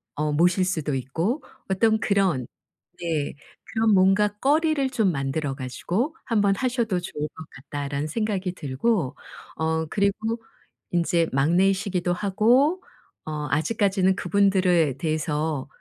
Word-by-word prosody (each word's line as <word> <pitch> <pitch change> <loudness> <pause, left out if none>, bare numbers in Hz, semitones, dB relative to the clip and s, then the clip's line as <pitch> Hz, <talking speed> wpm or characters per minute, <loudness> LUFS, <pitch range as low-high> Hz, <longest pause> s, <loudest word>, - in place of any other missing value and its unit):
어 150 +1 -1
모실 180 +4 +3
수도 160 -6 -1
있고 165 - -2 0.3
어떤 220 +3 +3
그런 190 - +1 0.5
네. 160 -4 -1 0.3
그런 220 -1 +1
뭔가 195 +2 +4
거리를 295 +1 +2
좀 220 -7 +2
만들어 135 0 -2
가지고 175 - -2
한번 205 -4 +2
하셔도 235 -6 0
좋을 150 -3 -4
것 160 - -11
같다라는 140 +1 -4
생각이 195 0 -2
들고 155 - -1 0.4
어 160 0 0
그리고 215 +5 0 0.5
이제 170 -1 +2
막내이시기도 180 +5 +2
하고 235 - +2 0.4
어 150 -1 -4
아직까지는 190 +3 +2
그분들에 185 -8 +2
대해서 155 -3 -1
185 Hz, 265 characters per minute, -24 LUFS, 155-210 Hz, 0.5 s, 뭔가